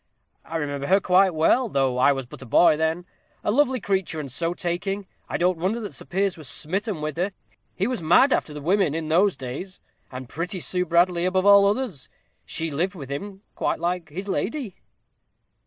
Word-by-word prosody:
"I 165 - -4
remember 145 -2 -3
her 195 +2 +5
quite 185 -1 +3
well, 230 +10 +3
though 135 -5 0
I 140 - +5
was 135 -2 -2
but 120 - -12
a - - -8
boy 155 +7 +5
then; 160 +3 -1 0.4
a - - +1
lovely 260 +1 +2
creature, 190 -6 -1
and 140 -3 -5
so 165 +6 -1
taking, 195 +3 -2 0.2
I - - -1
don't 180 -1 +1
wonder 195 +7 0
that 210 -3 -6
Sir - - -5
Piers 195 0 -1
was 155 -4 -7
smitten 195 - -1
with 155 -1 -3
her. 190 +3 -1 0.4
He 190 - 0
was 250 -2 -2
mad 175 - +5
after - - -1
the 150 0 -7
women 180 -2 +2
in 160 -1 -3
those 185 +5 +3
days, 140 +9 -7 0.3
and 130 -1 -7
pretty 170 +8 -4
Sue 180 +1 -1
Bradley 175 +1 +3
above 185 +1 +1
all 200 0 +7
others. 205 - -2 0.4
She 165 0 -3
lived 180 +7 -1
with 140 -5 -8
him 195 +7 -6
quite - - -1
like 175 0 -2
his 190 +7 -6
lady." 215 - -3
180 Hz, 200 wpm, -24 LUFS, 155-195 Hz, 0.4 s, all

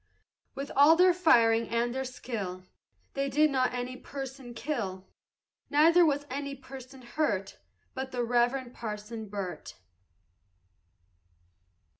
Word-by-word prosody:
With 275 +1 -5
all 290 +4 +7
their 360 +1 +5
firing 230 -10 +4
and 235 +1 0
their 265 +1 -2
skill 210 -8 -5 0.5
They 275 0 -1
did 300 +3 +3
not 255 -2 +2
any 250 +1 -4
person 265 -2 -8
kill; 225 -8 -4 0.6
Neither 330 +4 +6
was 290 -3 +1
any 280 +1 -4
person 265 -1 -11
hurt 230 -7 -2 0.3
But 265 0 -4
the 245 -1 -1
Reverend 245 +1 +1
Parson 215 0 -6
Burt. 190 -6 -6
255 Hz, 115 wpm, -29 LUFS, 230-280 Hz, 0.6 s, all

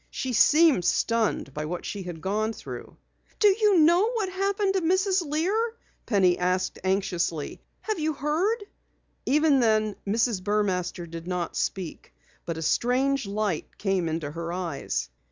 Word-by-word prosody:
She 260 -1 -3
seemed 300 - +5
stunned 225 - 0
by 150 +1 -4
what 175 +3 -5
she 200 - -4
had 175 -3 -7
gone 215 +3 -1
through. - - -9 0.4
"Do 420 - +6
you 415 -1 +3
know 345 +7 +5
what 430 -5 -1
happened 390 +1 0
to 380 - +1
Mrs. 375 +3 +2
Lear?" 385 +10 0 0.3
Penny 185 -5 +3
asked 180 +1 0
anxiously. 180 -5 -1 0.2
"Have 435 -4 -2
you 310 0 0
heard?" 340 - 0 0.6
Even 295 0 +4
then 215 -3 +2
Mrs. 225 -1 +1
Burmaster 185 -4 -1
did 165 +1 -8
not 180 -2 -3
speak. 185 -4 -4 0.3
But 165 -1 -3
a 160 - -4
strange 255 - +1
light 200 -5 -2
came 190 -4 0
into 160 -2 -3
her 170 +2 -5
eyes. 165 - -3
215 Hz, 150 wpm, -26 LUFS, -, 0.6 s, Do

